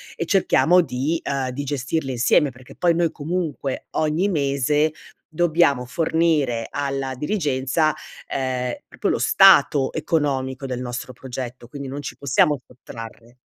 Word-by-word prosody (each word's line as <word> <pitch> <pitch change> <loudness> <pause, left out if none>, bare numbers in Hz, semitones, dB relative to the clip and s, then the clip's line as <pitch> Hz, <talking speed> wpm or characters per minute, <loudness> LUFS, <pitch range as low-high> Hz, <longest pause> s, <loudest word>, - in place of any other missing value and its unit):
e 170 - -3
cerchiamo 180 -1 +4
di, 150 +2 -2
ehm 135 -2 -2
di 130 +3 -4
gestirle 140 +1 -2
insieme", 130 +4 +3
perché 125 0 -15
poi 170 -2 +2
noi 170 -1 +1
comunque 155 -4 -3
ogni 160 +6 +1
mese 145 -1 +1 0.4
dobbiamo 155 -6 +2
fornire 155 -5 +1
alla 135 -2 -3
dirigenza, 150 -1 0 0.3
ehm, 130 -2 -2
proprio - - -4
lo - - 0
stato 140 -3 +5
economico 135 -4 -1
del 125 -2 -3
nostro 120 +1 -5
progetto, 125 -1 -7
quindi 140 +2 -7
non 140 +2 -5
ci - - -7
possiamo 140 +2 +2
sottrarre. 115 -1 -11
140 Hz, 135 wpm, -22 LUFS, 130-155 Hz, 0.4 s, stato